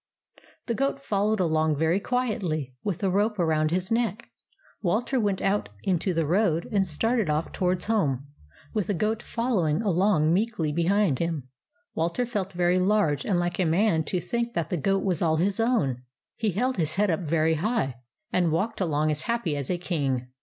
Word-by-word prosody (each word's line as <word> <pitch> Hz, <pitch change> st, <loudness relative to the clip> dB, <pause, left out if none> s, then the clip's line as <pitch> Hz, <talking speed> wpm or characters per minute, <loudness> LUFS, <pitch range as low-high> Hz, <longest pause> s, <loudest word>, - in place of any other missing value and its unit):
The 235 Hz, -, -1 dB
goat 275 Hz, +3 st, 0 dB
followed 210 Hz, -4 st, 0 dB
along 160 Hz, -3 st, +2 dB
very 160 Hz, +5 st, +2 dB
quietly, 200 Hz, -, -2 dB
with 200 Hz, -6 st, -1 dB
the 195 Hz, -, 0 dB
rope 210 Hz, +3 st, +1 dB
around 155 Hz, -3 st, +2 dB
his 180 Hz, +4 st, -1 dB
neck. 230 Hz, -2 st, -1 dB, 0.5 s
Walter 220 Hz, +7 st, 0 dB
went 205 Hz, -4 st, 0 dB
out 200 Hz, +1 st, +1 dB
into 185 Hz, 0 st, +1 dB
the 165 Hz, -2 st, 0 dB
road 170 Hz, 0 st, +1 dB
and 195 Hz, -3 st, +2 dB
started 220 Hz, +4 st, 0 dB
off 150 Hz, +2 st, -1 dB
to -, -, -5 dB
wards 180 Hz, 0 st, +1 dB
home, 145 Hz, -, 0 dB, 0.5 s
with 210 Hz, -4 st, -1 dB
the 205 Hz, -, 0 dB
goat 215 Hz, +5 st, 0 dB
following 220 Hz, -9 st, 0 dB
along 180 Hz, -5 st, +3 dB
meekly 190 Hz, -6 st, 0 dB
behind 170 Hz, -2 st, +2 dB
him. 160 Hz, -6 st, -2 dB, 0.4 s
Walter 170 Hz, +10 st, 0 dB
felt 200 Hz, -5 st, -3 dB
very 175 Hz, +1 st, +2 dB
large 185 Hz, -7 st, +2 dB
and 190 Hz, -, +2 dB
like 175 Hz, 0 st, -2 dB
a -, -, +4 dB
man 165 Hz, 0 st, +2 dB
to 180 Hz, -, -1 dB
think 235 Hz, +7 st, -3 dB
that 165 Hz, -2 st, -2 dB
the -, -, +1 dB
goat 195 Hz, +5 st, +1 dB
was 185 Hz, -5 st, 0 dB
all 160 Hz, -2 st, +3 dB
his 195 Hz, +5 st, +1 dB
own. 190 Hz, -, +1 dB, 0.3 s
He 220 Hz, -, 0 dB
held 250 Hz, +8 st, 0 dB
his 160 Hz, -2 st, -1 dB
head 205 Hz, -1 st, +2 dB
up 160 Hz, -, 0 dB
very 160 Hz, -1 st, +1 dB
high, 160 Hz, -, -1 dB, 0.4 s
and 175 Hz, -3 st, +2 dB
walked 195 Hz, +7 st, -1 dB
along 155 Hz, -3 st, +1 dB
as 150 Hz, 0 st, -2 dB
happy 230 Hz, -10 st, 0 dB
as 140 Hz, -2 st, -4 dB
a 180 Hz, -, 0 dB
king. 140 Hz, -8 st, -2 dB
180 Hz, 190 wpm, -26 LUFS, 160-210 Hz, 0.5 s, a